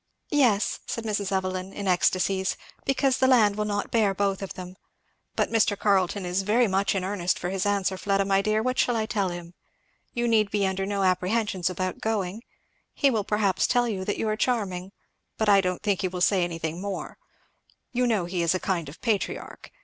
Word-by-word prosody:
"Yes," 245 -9 +2
said 230 - -3
Mrs. 205 -3 -2
Evelyn 185 0 -2
in 200 -1 -5
ecstacies, 185 +1 +1 0.3
"because 270 -1 +2
the 260 - +4
land 220 -6 +5
will 210 0 -1
not 205 -1 -2
bear 210 -4 +2
both 195 0 0
of 195 - -6
them. 185 0 -8 0.6
But - - 0
Mr. 215 -2 +2
Carleton 195 -1 +1
is 180 +2 0
very 225 +5 +3
much 195 +1 +1
in 190 - -1
earnest 185 -2 0
for 180 - -3
his 195 +1 -1
answer, 195 -2 0
Fleda 195 -1 +1
my 195 0 +3
dear 215 +1 +1
what 255 +1 -1
shall 245 - +2
I 220 -1 0
tell 205 -4 -1
him? 175 0 -8 0.6
You 240 0 0
need 215 -3 +3
be 205 -1 +1
under 190 0 -1
no 200 -1 -1
apprehensions 185 0 +1
about 185 0 -3
going 215 -2 -2 0.5
he 280 -2 +3
will 220 -4 0
perhaps 200 -2 +1
tell 245 -1 +2
you 195 -5 -3
that 205 - -1
you 225 - -1
are 215 - +1
charming, 200 -6 -1 0.5
but 220 - 0
I 200 -1 +6
don't 180 0 -2
think 205 -3 +1
he 185 - +1
will 180 0 -5
say 185 0 +3
anything 165 0 -3
more. 200 -1 -5 0.7
You 250 0 +1
know 215 -7 +1
he 175 0 -2
is 170 +2 +2
a - - 0
kind 170 -6 -2
of 150 - -13
patriarch! 220 -5 -2
195 Hz, 205 wpm, -26 LUFS, 185-215 Hz, 0.7 s, I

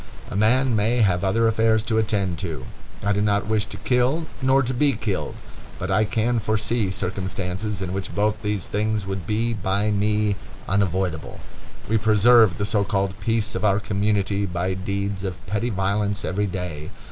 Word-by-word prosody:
A - - -4
man 120 +4 +3
may 115 +3 +2
have 90 -4 +2
other 115 +4 +2
affairs 110 -1 +3
to 110 -1 +1
attend 100 -5 0
to. 80 -9 -4 0.4
I 105 - +2
do 100 - 0
not 100 -1 +1
wish 110 -1 0
to - - -6
kill 130 +6 +1 0.2
nor 135 +1 +4
to 130 +1 -1
be 140 +3 +2
killed, 105 -4 -3 0.4
but - - -3
I 105 - +3
can 115 +3 0
foresee 110 0 0
circumstances 95 +1 -3
in 90 0 -4
which 95 0 -4
both 105 +1 +1
these 105 -3 -2
things 105 0 -1
would 95 -3 -4
be 115 +2 0
by 100 0 0
me 105 0 +1 0.3
unavoidable. 95 -4 -1 0.5
We 110 +1 +2
preserve 110 -2 +5
the 100 - -1
so 105 0 +1
called 100 -1 0
peace 110 0 0
of 95 - -3
our 100 -1 +3
community 100 -1 0
by 90 +1 -1
deeds 100 +1 -3
of 95 -2 -5
petty 105 +5 -1
violence 100 0 -1
every 100 +3 0
day. 90 -5 -5
105 Hz, 175 wpm, -23 LUFS, 95-110 Hz, 0.5 s, preserve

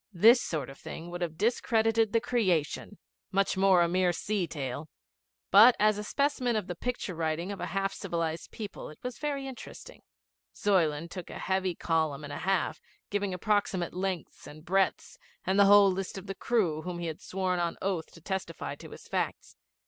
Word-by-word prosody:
This 230 +8 +7
sort 150 -6 -3
of 135 - -14
thing 170 +2 -8
would 175 0 -5
have 165 -2 -3
discredited 225 0 +2
the 230 - +3
Creation, 205 -5 0 0.3
much 195 0 +2
more 190 -2 +5
a - - +2
mere 180 +1 +2
sea 195 +1 -1
tale, 145 0 -5 0.6
but 225 +5 +9
as 215 0 +3
a - - -3
specimen 255 0 0
of 215 - 0
the 180 - -4
picture 235 0 -3
writing 165 +3 -2
of 200 - -6
a 180 - -3
half 195 +2 -1
civilised 165 -4 -3
people 210 -3 -7
it 155 - -12
was 250 -1 -5
very 285 -2 -2
interesting. 265 -2 -9 0.5
Zuyland 170 -5 +1
took 180 -2 -7
a - - -7
heavy 190 -1 0
column 160 -4 0
and 145 0 -6
a - - -5
half, 190 0 0 0.3
giving 200 -1 0
approximate 190 -2 0
lengths 185 -2 -4
and 155 +2 -12
breadths, 195 +1 0 0.3
and 190 +2 +2
the 200 - +8
whole 200 -1 +7
list 190 +1 -4
of 190 - -7
the 195 - -4
crew 190 -7 0
whom 180 +1 -5
he 175 - -4
had 165 +3 -5
sworn 185 -1 -1
on 170 -1 -1
oath 185 -4 -2
to 165 - -14
testify 185 -2 -4
to - - -11
his - - -12
facts. - - -3
190 Hz, 190 wpm, -29 LUFS, 170-205 Hz, 0.6 s, but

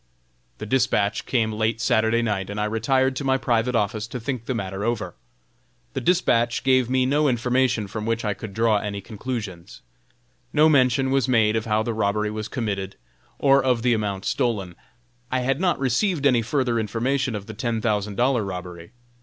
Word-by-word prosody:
The 110 - -6
dispatch 110 -3 +1
came 115 -4 +1
late 110 +1 0
Saturday 110 0 +2
night, 100 -4 -2
and 100 +1 -4
I 105 - +1
retired 130 +5 +1
to 145 - -3
my 135 -1 +2
private 120 -1 0
office 105 0 -1
to 125 - -6
think 120 0 -4
the 130 - -1
matter 95 -2 -4
over. 115 -1 -2 0.8
The - - -3
dispatch 125 -9 +2
gave 130 -2 +3
me 130 0 +2
no 145 +3 +2
information 125 -2 +1
from 105 +2 -5
which 115 0 -1
I 105 - 0
could 100 0 -9
draw 110 -2 +3
any 100 -1 -4
conclusions. 105 -4 -7 0.7
No 155 +1 +5
mention 130 -2 +3
was 135 -1 +2
made 110 -4 +3
of 110 - -1
how 110 -1 +1
the 115 - -2
robbery 105 0 0
was 110 0 -4
committed, 100 -6 -3 0.4
or 140 -1 +4
of 125 -3 +1
the 125 -1 +3
amount 100 -3 -2
stolen. 110 -9 -1 0.6
I 130 0 +1
had 135 +5 0
not 180 -2 +2
received 145 - 0
any 125 -4 +4
further 120 0 0
information 120 +4 -1
of 100 -1 -6
the 110 - -8
ten 115 +1 -2
thousand 105 -2 -1
dollar 125 -1 +2
robbery. 90 0 -7
115 Hz, 185 wpm, -23 LUFS, 105-130 Hz, 0.8 s, No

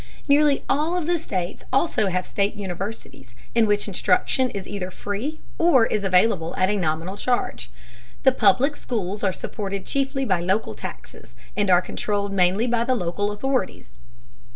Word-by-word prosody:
Nearly 285 0 +4
all 310 +6 +1
of 350 - -2
the 345 +1 +1
states 185 - -4
also 270 -7 +2
have 185 -1 -1
state 200 0 -1
universities 190 - -7 0.2
in 230 -2 +4
which 205 0 +1
instruction 205 +6 +1
is 195 -4 -6
either 185 -3 -4
free 215 - -4 0.2
or 310 -9 +5
is 210 -2 -1
available 185 -3 +2
at 185 +2 +2
a - - +1
nominal 170 +1 -2
charge. 240 - -1 0.5
The 265 - +7
public 250 +5 +3
schools 210 -6 -4
are 195 - +3
supported 195 0 -5
chiefly 270 0 -1
by 185 -6 +1
local 190 - 0
taxes - - -9 0.2
and 205 -2 +1
are 180 0 +5
controlled 200 0 -2
mainly 190 +4 +3
by 240 -1 +1
the 255 +2 +1
local 205 0 -1
authorities. 250 - -2
205 Hz, 160 wpm, -23 LUFS, 185-255 Hz, 0.5 s, The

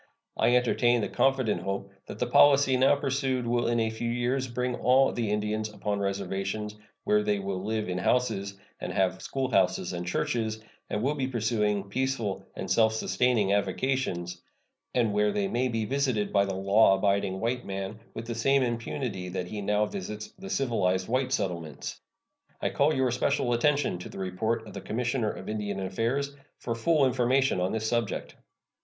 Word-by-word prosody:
I 120 - +3
entertain 120 -1 +3
the - - -1
confident 130 -5 +1
hope 100 0 -4 0.2
that - - -7
the 125 - 0
policy 135 +2 +5
now 130 +2 +5
pursued 135 -3 -1
will 120 0 +1
in 120 0 +2
a 110 -1 +1
few 115 +1 -3
years 125 +2 0
bring 125 +1 -2
all 130 +2 +4
the 115 -3 -2
Indians 105 +1 -1
upon 105 -1 -2
reservations, 100 +1 -2 0.3
where 105 0 +3
they 105 -1 +1
will 95 -1 -3
live 110 0 -1
in 90 0 -2
houses, 100 -3 0 0.2
and - - -4
have 95 -1 0
schoolhouses 130 -7 0
and 90 0 -4
churches, 110 +4 -1 0.3
and 105 - -2
will 140 +3 +2
be 135 -3 -2
pursuing 110 -4 0
peaceful 125 -4 -2
and - - -4
self 110 -1 +4
sustaining 110 -2 +1
avocations, 100 -6 -1 0.5
and 115 -4 +2
where 105 0 +2
they 100 -1 0
may 125 +5 0
be 115 -3 -1
visited 130 -4 0
by 100 -1 +4
the 95 -1 -3
law 100 +1 +5
abiding 100 -1 +1
white 120 +3 -1
man 95 +2 -5 0.2
with 115 - -5
the 115 - -3
same 135 +4 +3
impunity 115 -5 -3
that 90 -1 -4
he 105 -1 -4
now 105 +1 +2
visits 105 - -6
the 195 +1 -8
civilized 95 - 0
white 130 +2 0
settlements. 85 - -3 0.6
I - - -1
call 145 +2 +3
your 130 -4 +1
special 125 0 +1
attention 140 -5 +1
to - - -8
the - - -10
report 110 +5 -2
of - - -11
the - - -6
Commissioner 120 0 -1
of - - -7
Indian 105 -2 -3
Affairs 115 +9 -1 0.2
for 115 - -3
full 145 +5 +3
information 130 -2 +2
on 90 - 0
this 110 0 -1
subject. 115 -3 -1
110 Hz, 175 wpm, -28 LUFS, 100-125 Hz, 0.6 s, policy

